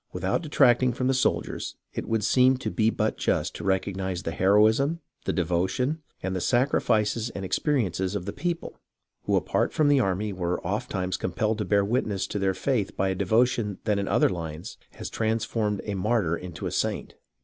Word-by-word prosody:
Without -, -, -1 dB
detracting 130 Hz, -5 st, +3 dB
from 125 Hz, +2 st, -2 dB
the 135 Hz, -, +3 dB
soldiers 130 Hz, -, -1 dB, 0.2 s
it -, -, -4 dB
would 110 Hz, -2 st, 0 dB
seem 130 Hz, +4 st, +4 dB
to 130 Hz, -, -4 dB
be 110 Hz, -1 st, +2 dB
but 110 Hz, -1 st, -1 dB
just -, -, 0 dB
to -, -, -7 dB
recognize 95 Hz, -1 st, -1 dB
the 80 Hz, -, -2 dB
heroism, 110 Hz, -, +3 dB, 0.3 s
the -, -, +1 dB
devotion, 95 Hz, -, 0 dB, 0.2 s
and 95 Hz, 0 st, -2 dB
the 90 Hz, -, -2 dB
sacrifices 120 Hz, -3 st, +1 dB
and 95 Hz, -, -4 dB
experiences 95 Hz, -, 0 dB
of 90 Hz, -, -3 dB
the 100 Hz, -, -4 dB
people, 175 Hz, -1 st, -4 dB, 0.5 s
who -, -, +2 dB
apart -, -, +1 dB
from 150 Hz, -2 st, +2 dB
the 145 Hz, -1 st, +5 dB
army 100 Hz, -1 st, 0 dB
were 90 Hz, -1 st, -2 dB
ofttimes 95 Hz, -2 st, -2 dB
compelled 105 Hz, +4 st, -1 dB
to 105 Hz, -, -1 dB
bear 100 Hz, -1 st, +2 dB
witness 105 Hz, -4 st, 0 dB
to 105 Hz, -, -4 dB
their 95 Hz, -1 st, +1 dB
faith 115 Hz, -4 st, -1 dB
by 95 Hz, 0 st, +1 dB
a -, -, +1 dB
devotion 110 Hz, +1 st, +1 dB
that 105 Hz, -2 st, +1 dB
in 100 Hz, -, -2 dB
other 115 Hz, +4 st, +3 dB
lines 80 Hz, -3 st, -6 dB
has -, -, -7 dB
transformed 110 Hz, -2 st, -1 dB
a 105 Hz, -, -3 dB
martyr 100 Hz, -3 st, +1 dB
into 90 Hz, -1 st, -7 dB
a -, -, -2 dB
saint. -, -, -2 dB
105 Hz, 185 wpm, -26 LUFS, 95-120 Hz, 0.5 s, the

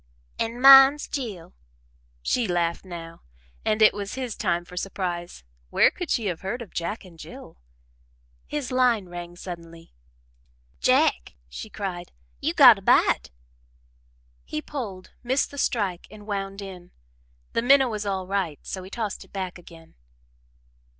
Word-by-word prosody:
"An' 230 Hz, +1 st, -2 dB
mine's 270 Hz, +2 st, +8 dB
Jill." 220 Hz, -, -5 dB, 0.7 s
She 240 Hz, -, +1 dB
laughed 170 Hz, -1 st, 0 dB
now, 165 Hz, -2 st, -9 dB, 0.4 s
and 215 Hz, 0 st, +2 dB
it 215 Hz, -, +7 dB
was 200 Hz, +1 st, -5 dB
his 255 Hz, -4 st, -4 dB
time 175 Hz, -3 st, -1 dB
for 180 Hz, -, -12 dB
surprise 175 Hz, -, -4 dB, 0.3 s
where -, -, +4 dB
could 355 Hz, -4 st, -6 dB
she 230 Hz, -, 0 dB
have 180 Hz, -4 st, -2 dB
heard 225 Hz, +6 st, -4 dB
of 210 Hz, -, -16 dB
Jack 190 Hz, +5 st, -4 dB
and 170 Hz, -3 st, -16 dB
Jill? -, -, -11 dB, 0.9 s
His 290 Hz, -4 st, -4 dB
line 245 Hz, -7 st, +2 dB
rang 175 Hz, 0 st, -8 dB
suddenly. 170 Hz, -2 st, -10 dB, 0.9 s
"Jack," -, -, +2 dB
she 215 Hz, -, -8 dB
cried, 190 Hz, -4 st, -5 dB, 0.3 s
"you -, -, -1 dB
got -, -, +9 dB
a -, -, -15 dB
bite!" -, -, +3 dB, 1.1 s
He 150 Hz, -, -4 dB
pulled, 195 Hz, -, -7 dB
missed 260 Hz, +3 st, 0 dB
the 285 Hz, -, -7 dB
strike, 195 Hz, -9 st, -1 dB
and 210 Hz, -1 st, -13 dB
wound 195 Hz, -1 st, -4 dB
in. 180 Hz, -2 st, -10 dB, 0.6 s
The -, -, +1 dB
minnow 265 Hz, +2 st, +5 dB
was 215 Hz, -3 st, -3 dB
all 190 Hz, -2 st, -2 dB
right, 185 Hz, -6 st, -2 dB
so 190 Hz, -, -5 dB
he 185 Hz, -, -10 dB
tossed 215 Hz, -1 st, -4 dB
it -, -, -22 dB
back 185 Hz, -2 st, -5 dB
again. 165 Hz, -2 st, -15 dB
195 Hz, 150 wpm, -25 LUFS, 175-230 Hz, 1.1 s, got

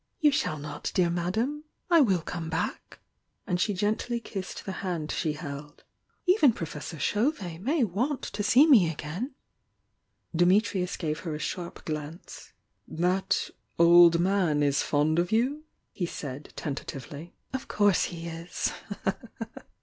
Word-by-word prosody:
"You 300 Hz, -1 st, +5 dB, 0.2 s
AaR 155 Hz, -, -3 dB
not, 150 Hz, 0 st, -5 dB
dear 175 Hz, -2 st, +3 dB
Madame! 220 Hz, -, -1 dB, 0.3 s
I 335 Hz, -2 st, +7 dB
will 190 Hz, -, +3 dB
come 170 Hz, -2 st, -5 dB
back." 165 Hz, +1 st, -3 dB, 0.5 s
And 180 Hz, -4 st, -1 dB
Ae -, -, +1 dB
gently 215 Hz, +4 st, 0 dB
kissed 195 Hz, -4 st, -6 dB
the 195 Hz, -, -3 dB
hand 170 Hz, -5 st, -2 dB
she 155 Hz, -4 st, -1 dB
held. 145 Hz, -1 st, -8 dB, 0.4 s
"Even 360 Hz, -, +5 dB
Profearar 160 Hz, -2 st, -6 dB
Chauvet 205 Hz, -, 0 dB
may 280 Hz, -, +2 dB
want 240 Hz, -, -1 dB
to 205 Hz, -, -4 dB
see 245 Hz, +8 st, +6 dB
me 225 Hz, -, +6 dB
again!" 175 Hz, -, -5 dB, 1.0 s
IMmitriufl 185 Hz, +1 st, +2 dB
gave 155 Hz, -3 st, -2 dB
her 160 Hz, -4 st, -4 dB
a -, -, -3 dB
sharp 170 Hz, +3 st, -5 dB
glance. 155 Hz, +2 st, -6 dB, 0.4 s
"That 180 Hz, +3 st, 0 dB, 0.3 s
oU 170 Hz, 0 st, +9 dB
man 175 Hz, -5 st, +2 dB
is 140 Hz, -1 st, +2 dB
fond 155 Hz, +2 st, +2 dB
of 175 Hz, 0 st, 0 dB
you?" 265 Hz, +8 st, +1 dB, 0.3 s
he 175 Hz, -, -3 dB
said, 140 Hz, -3 st, -7 dB
tenta 145 Hz, -4 st, -4 dB
tivftlv. 145 Hz, +5 st, -8 dB, 0.2 s
"Of 265 Hz, -, -4 dB
course 205 Hz, -2 st, +3 dB
he 170 Hz, -1 st, -6 dB
is!" 165 Hz, +1 st, -3 dB
175 Hz, 140 wpm, -28 LUFS, 155-215 Hz, 1.0 s, oU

